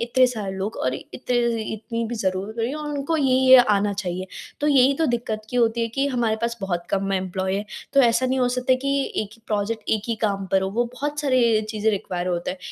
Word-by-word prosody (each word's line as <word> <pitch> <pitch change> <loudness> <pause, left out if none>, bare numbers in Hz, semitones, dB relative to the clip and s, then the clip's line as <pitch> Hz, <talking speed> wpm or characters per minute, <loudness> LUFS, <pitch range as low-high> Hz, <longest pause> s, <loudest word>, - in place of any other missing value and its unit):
इतने 240 +2 +3
सारे 215 -6 -4
लोग 200 +4 -3
और 130 - +1
इते 190 - -10 0.5
इतनी 230 +2 -4
भी 240 - -3
ज़रूरत 195 0 -2
करी 230 +4 -1
और 300 -1 -5
उनको 290 +2 -1
ये-ये 260 -2 +6
आना 205 -3 +3
चाहिए। 185 -2 -4 0.3
तो 295 - +1
यही 270 -1 +5
तो 320 - +1
दिक्कत 230 -3 -2
की 250 - -2
होती 230 -1 +2
है 230 - 0
कि 275 +1 +1
हमारे 235 -4 0
पास 235 0 -1
बहुत-कम 195 +1 -2
एम्प्लॉयी 190 0 -1
है। 205 - -3 0.3
तो 275 - +7
ऐसा 245 0 +3
नहीं 260 +1 0
हो 250 -1 +2
सकता 250 +1 +1
है - - +4
कि 275 +2 -2 0.3
एक 205 - -9
ही 230 - -23
प्रोजेक्ट 215 +1 -1
एक 215 -2 +1
ही 230 - +1
काम 195 -2 0
पर 190 0 +4
हो, 190 - -1
वो 240 +4 +1
बहुत 295 +3 -3
सारे 245 -6 +3
चीज़ें 215 0 +1
रिक्वायर 180 -3 -3
होता 175 -1 -1
है। 185 - -7
230 Hz, 230 wpm, -23 LUFS, 195-255 Hz, 0.5 s, तो